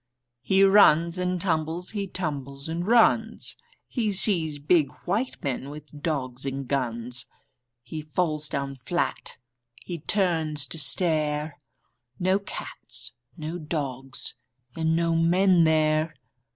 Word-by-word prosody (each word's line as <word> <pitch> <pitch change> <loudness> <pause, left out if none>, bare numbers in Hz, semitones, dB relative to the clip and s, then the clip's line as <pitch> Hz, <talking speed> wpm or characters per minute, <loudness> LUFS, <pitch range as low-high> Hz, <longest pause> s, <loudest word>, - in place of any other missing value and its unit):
He 190 +8 +3
runs 180 -3 +5
and 180 0 -1
tumbles, 165 0 -1
he 200 -2 -3
tumbles 140 -6 -4
and 170 +3 -3
runs. 225 -1 +3 0.3
He 225 -5 -1
sees 170 -6 +4
big 145 0 +2
white 210 +8 -1
men 135 0 -3
with 150 0 -11
dogs 130 -6 -2
and 135 -1 -3
guns. 125 -2 -2 0.6
He 155 +6 -6
falls 155 -1 -1
down 140 0 -3
flat. 130 -2 -3 0.5
H)e 175 -2 -5
turns 160 -5 +2
to 165 - 0
stare 150 0 +1 0.3
— 120 +1 -42
No 190 +1 +4
cats, 200 - -6 0.3
no 160 +2 -5
dogs, 135 -5 -3 0.4
and 160 0 +1
no 165 0 +1
men 175 +1 +4
there. 155 0 +2
160 Hz, 125 wpm, -26 LUFS, 140-180 Hz, 0.6 s, runs